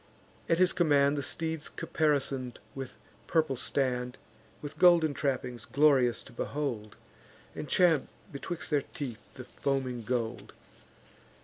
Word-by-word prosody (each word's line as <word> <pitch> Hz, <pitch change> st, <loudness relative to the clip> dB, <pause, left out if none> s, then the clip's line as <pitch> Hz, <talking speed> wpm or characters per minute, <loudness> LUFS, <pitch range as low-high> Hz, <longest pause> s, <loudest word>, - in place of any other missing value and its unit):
At 165 Hz, -, +4 dB
his 185 Hz, +1 st, +4 dB
command 145 Hz, -4 st, +4 dB
The 145 Hz, -, -1 dB
steeds 160 Hz, +2 st, -2 dB
caparison'd 140 Hz, -5 st, -1 dB, 0.2 s
with 135 Hz, -2 st, -7 dB, 0.3 s
purple 155 Hz, -5 st, +2 dB
stand, 125 Hz, -1 st, -1 dB, 0.4 s
With 150 Hz, +1 st, -8 dB
golden 170 Hz, -4 st, +6 dB
trappings, 130 Hz, -4 st, -2 dB
glorious 135 Hz, -6 st, +3 dB
to -, -, -14 dB
behold, 120 Hz, -5 st, -3 dB, 0.6 s
And 150 Hz, -, -6 dB
champ 170 Hz, -4 st, +4 dB, 0.2 s
betwixt 160 Hz, +4 st, -6 dB
their 145 Hz, -2 st, +3 dB
teeth 125 Hz, -5 st, -7 dB
the 130 Hz, -, -8 dB
foaming 130 Hz, -1 st, -2 dB
gold. 120 Hz, 0 st, -3 dB
140 Hz, 120 wpm, -30 LUFS, 125-155 Hz, 0.6 s, golden